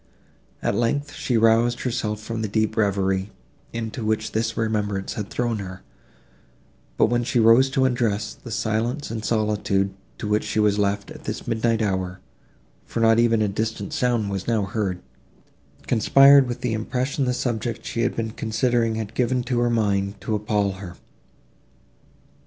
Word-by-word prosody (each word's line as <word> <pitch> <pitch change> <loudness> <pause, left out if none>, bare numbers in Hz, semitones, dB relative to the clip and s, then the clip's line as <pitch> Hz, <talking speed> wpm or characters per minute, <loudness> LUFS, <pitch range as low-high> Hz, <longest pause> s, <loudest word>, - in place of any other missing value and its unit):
At - - +1
length, 145 +5 0
she 120 - -1
roused 115 +2 +3
herself 110 -4 -2
from 115 +1 -5
the 110 - -1
deep 110 +1 0
reverie, 95 -2 +1 0.4
into 115 0 -4
which 110 0 -1
this 110 +1 -1
remembrance 105 -3 -1
had 105 -2 -5
thrown 120 -3 -1
her; 95 -1 -8 1.1
but, - - +5
when 120 +2 +1
she 120 - 0
rose 115 +4 +6
to 130 0 +2
undress, 110 -4 0
the 120 - -12
silence 115 +5 -1
and 110 -2 -4
solitude, 105 -3 0 0.2
to - - -5
which 105 +1 +1
she - - -2
was 105 -1 +3
left, 100 0 0
at - - -11
this - - -4
midnight 115 0 +1
hour, 95 -2 -2 0.6
for - - -5
not 115 0 +5
even 115 -2 +3
a - - +1
distant 105 0 -3
sound 120 -5 0
was 95 -1 -4
now 115 -3 +1
heard, 100 -3 -3 0.8
conspired 135 +4 +6
with 120 - -5
the 120 -2 -1
impression 125 +5 -1
the 125 - +1
subject 120 -2 -3
she 115 - -2
had 120 - 0
been 110 -1 -2
considering 115 0 0
had 110 -1 -4
given 125 +1 +1
to 120 -1 -1
her 120 0 +2
mind, 100 -3 0
to 110 - -3
appall 105 -1 0
her. 95 -2 -9
110 Hz, 165 wpm, -23 LUFS, 105-120 Hz, 1.1 s, rose